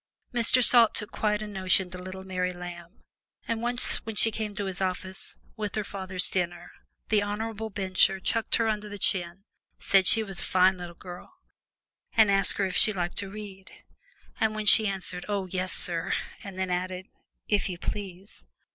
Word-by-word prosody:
Mr. 245 +1 +4
Salt 235 -2 +6
took 210 0 -3
quite 210 0 0
a - - -6
notion 190 -2 +3
to 185 - -7
little 185 +1 -8
Mary 185 -1 -2
Lamb, 175 +1 -9 0.4
and 230 -1 -2
once 245 +1 +1
when 225 -1 -7
she 225 +2 +4
came 210 -1 -4
to 205 - -2
his 190 0 -4
office 185 0 -3 0.2
with 210 -2 -4
her 215 - -1
father's 190 -2 +1
dinner, 175 -1 -2 0.4
the 215 -1 +3
honorable 220 +2 -4
Bencher 190 -1 +2
chucked 225 +3 +1
her 230 - +1
under 210 -1 -2
the 205 - -7
chin, 180 -1 -1 0.4
said 195 -2 +3
she 225 - +5
was 195 -4 -3
a - - -3
fine 185 0 +3
little 175 -1 -8
girl, 180 - -11 0.8
and 220 -2 +6
asked 195 0 +2
her 200 - +1
if 185 - -3
she 220 - +4
liked 175 -3 -3
to 200 - -5
read. 195 -2 -9 0.7
And 220 -1 +1
when 215 0 -3
she 215 +1 +7
answered, 185 -2 -3
"Oh, 200 -2 -1
yes, 185 0 -3
sir!" 170 -1 0 0.3
and 195 -2 -9
then 190 -1 -2
added, 185 +1 -3 0.4
"If 205 -2 +1
you 180 - -5
please!" 190 - -6
195 Hz, 185 wpm, -27 LUFS, 185-210 Hz, 0.8 s, she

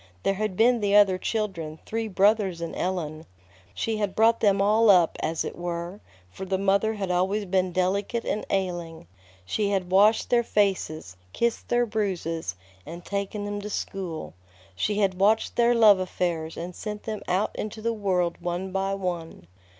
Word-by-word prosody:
There - - +2
had 205 -1 -3
been 240 +2 +4
the 205 -1 +1
other 195 -3 +5
children, 185 -9 -3
three 225 0 -3
brothers 200 -2 +2
and 170 -1 -5
Ellen. 160 -4 -3 0.5
She 225 -1 -1
had 205 -2 -2
brought 225 +1 +4
them 200 -2 +3
all 215 +3 +4
up, 180 -4 +5
as 165 0 -1
it - - -5
were, 175 +2 -5 0.3
for 190 - -8
the 190 0 -1
mother 200 +3 +1
had 195 -3 -3
always 190 +4 0
been 185 -1 0
delicate 195 +6 -1
and 210 - -2
ailing. 175 - -3 0.4
She 205 - -1
had 190 -3 -1
washed 210 +4 +4
their 240 -1 +5
faces, 190 - -1 0.2
kissed 235 -1 -1
their 240 0 +3
bruises, 180 - -2 0.3
and 170 +2 -9
taken 200 +1 -3
them 205 0 -4
to 210 - -6
school. 185 - -5 0.4
She 205 - -1
had 195 -3 +1
watched 215 +3 +2
their 240 0 +4
love 215 -4 +6
affairs 170 -3 -2
and 175 +1 -6
sent 210 -1 -6
them 215 -2 -4
out 185 +4 0
into 215 +1 -5
the 230 +1 -1
world 185 -6 -1
one 175 +2 -3
by 195 +1 -1
one. 175 - -5
195 Hz, 175 wpm, -26 LUFS, 180-210 Hz, 0.5 s, love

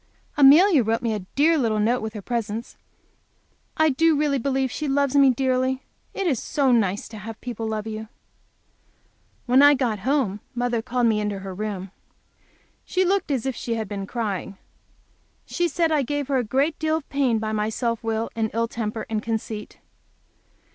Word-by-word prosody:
Amelia 295 +3 +7
wrote 225 +2 -1
me 230 -2 0
a 210 - -2 0.2
dear 315 +3 +4
little 225 -4 +1
note, 235 +4 +1
with 220 0 -5
her 205 - -6
presents. 230 -1 -4 1.0
I 315 -1 +4
do 320 +3 +3
really 290 -2 +1
believe 265 0 0
she 300 +6 -3
loves 280 0 +1
me 275 -1 +6
dearly. 260 +1 0 0.3
It 390 - -2
is 275 -10 +1
so 275 -3 +1
nice 205 -4 +1
to 220 - -9
have 220 +2 -8
people 230 -3 -5
love 215 -1 -3
you! 220 0 -6 1.4
When 255 +2 +5
I 290 0 +7
got 240 -6 -1
home 235 -3 0 0.2
mother 245 -1 0
called 245 +1 0
me 220 -2 +3
into 210 -1 -2
her 190 -1 -6
room. 195 -2 -5 0.9
She 370 0 0
looked 390 -1 +1
as 265 -5 -1
if 265 -2 -2
she 230 - -3
had 220 -2 -3
been 195 -1 -5
crying. 200 -5 -4 0.9
She 350 - 0
said 330 0 0
I 305 -2 +3
gave 285 +1 -3
her 275 - +2
a 250 - +1
great 275 +7 0
deal 315 0 +1
of 310 - -9
pain 270 -5 +1
by 215 0 -3
my 215 0 0
self 230 0 -2
will 225 0 -2
and 220 -1 0
ill 230 0 +1
temper 225 -1 -4
and 215 -1 -2
conceit. 220 -1 -4
240 Hz, 185 wpm, -24 LUFS, 220-280 Hz, 1.4 s, Amelia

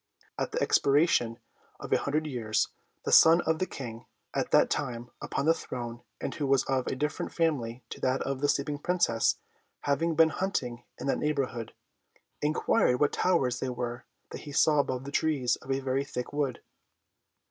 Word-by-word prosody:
At - - -3
the - - -1
expiration 140 -5 +3 0.4
of - - -8
an - - +4
hundred 155 +2 -1
years, 115 -7 0 0.4
the - - -1
son 165 +2 +8
of 160 -1 0
the 185 - 0
King 120 -3 -8 0.3
at - - -1
that - - +5
time 120 0 -3
upon 140 - -2
the 165 - +6
throne, 120 -6 -6 0.2
and - - -3
who 145 - -2
was 135 -1 +3
of 130 -1 -1
a - - -1
different 150 +3 -2
family 130 -8 -1
to - - -6
that 130 +1 +1
of 135 0 -3
the 145 - +2
sleeping 145 +1 0
Princess, 170 -9 +2 0.5
having 160 +3 0
been 160 0 +6
hunting 125 -11 -3
in - - -5
that 140 - +1
neighbourhood, 135 -6 -2 0.7
inquired 145 -4 +2
what 145 - +2
towers 130 -9 +1
they 130 - -2
were 120 -1 -4 0.3
that - - -7
he 145 - -9
saw 150 +1 +4
above 130 -2 0
the 140 - -7
trees 145 -5 +1
of 130 - -16
a 135 - +1
very 135 +1 0
thick 125 -2 -5
wood. 140 -4 -2
135 Hz, 180 wpm, -29 LUFS, 125-150 Hz, 0.7 s, son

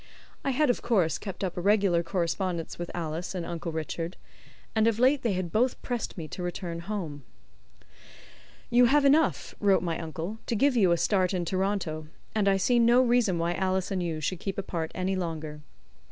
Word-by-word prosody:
I - - 0
had, 270 0 +3
of - - -4
course, 195 -9 +1
kept 195 -1 -6
up 185 -3 -2
a 175 - -3
regular 195 -3 +3
correspondence 170 -1 -2
with 175 - -4
Alice 170 +2 -4
and 175 -2 -3
Uncle 170 -1 -4
Richard, 165 +2 -4 0.6
and 220 0 +4
of 225 -2 +2
late 260 +4 +4
they 230 -4 0
had 180 -2 -3
both 245 +4 +1
pressed 245 -5 -3
me 160 -3 -5
to - - -6
return 175 -1 -4
home. 170 -6 -5 1.5
"You 245 +1 +6
have 285 +3 +4
enough," 300 +3 +3
wrote 195 -3 +3
my 165 -2 -2
uncle, 165 +6 -5
"to 235 - 0
give 270 +4 +3
you 195 -7 +4
a 170 - +4
start 185 0 +1
in 175 -1 -1
Toronto, 185 -4 -1 0.3
and 210 -2 +1
I 195 -1 +4
see 240 +5 +3
no 235 +1 +5
reason 240 -7 +2
why 170 +1 0
Alice 190 +1 -1
and 190 -2 0
you 165 -3 -2
should 170 +3 -2
keep 195 +1 -4
apart 170 -5 -3
any 185 +1 -1
longer. 160 -4 -4
185 Hz, 195 wpm, -28 LUFS, 170-220 Hz, 1.5 s, You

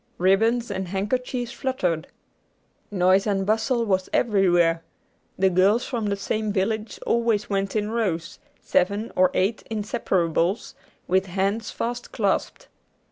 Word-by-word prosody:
Ribbons 225 +5 +2
and 190 -1 -3
handkerchiefs 240 +6 -2
fluttered. 185 -14 -2 0.8
Noise 190 +1 +3
and 195 -2 0
bustle 225 +3 +1
was 190 -3 0
everywhere. 175 -7 +3 0.6
The 190 0 +3
girls 195 +6 +3
from 230 -5 -2
the 200 - 0
same 215 +2 -2
village 215 +2 -2
always 230 -3 +1
went 195 0 -1
in 210 0 0
rows, 185 -8 -2 0.2
seven 205 +5 +1
or 185 0 +5
eight 200 +4 +1
inseparables, 195 -4 0 0.3
with 190 +1 +2
hands 195 +4 -1
fast 240 +1 -4
clasped. 205 -5 -1
200 Hz, 125 wpm, -24 LUFS, 190-225 Hz, 0.8 s, or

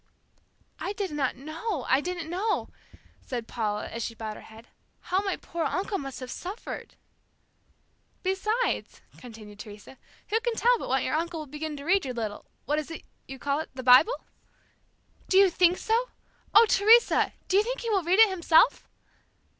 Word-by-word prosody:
"I 400 - -3
did 400 -4 -3
not 285 -3 -1
know, 310 - -4
I 265 +2 +3
did 360 +3 -4
not 340 - -5
know," 380 +7 -1 0.5
said 240 -3 -5
Paula, 210 -3 -2
as 230 - -6
she 230 - -5
bowed 220 -1 -5
her - - -11
head; 225 +2 -15 0.3
"how 370 - -1
my 390 -2 -1
poor 340 -1 -4
uncle 395 +1 -2
must 270 -2 -7
have 255 - -6
suffered!" 385 +6 -7 1.3
"Besides," 425 +6 -1 0.2
continued 215 -4 -12
Teresa, 210 +4 -11 0.3
"who 440 +2 +2
can 470 0 -2
tell 485 +1 +3
but - - -6
what 265 0 +1
your 260 - -2
uncle 330 +1 -2
will - - -7
begin 300 +1 -6
to 280 - -8
read 385 +3 +3
your 255 -2 -5
little 215 -3 -4 0.2
what 295 +1 0
is 305 - -6
it 325 - -8 0.2
you 270 - -8
call 280 +2 -1
it? 315 - -5
the 260 - -6
Bible?" 255 - +6 1.1
"Do 380 - +4
you 390 -2 +6
think 355 +1 +3
so? 470 +3 0 0.4
Oh, 435 +3 +8
Teresa! 445 +3 +4
Do 375 - +2
you - - +6
think - - -4
he 465 -2 -2
will 395 -3 +2
read 355 +3 +2
it 445 0 +8
himself?" 340 -3 +3
330 Hz, 185 wpm, -27 LUFS, 260-400 Hz, 1.3 s, Oh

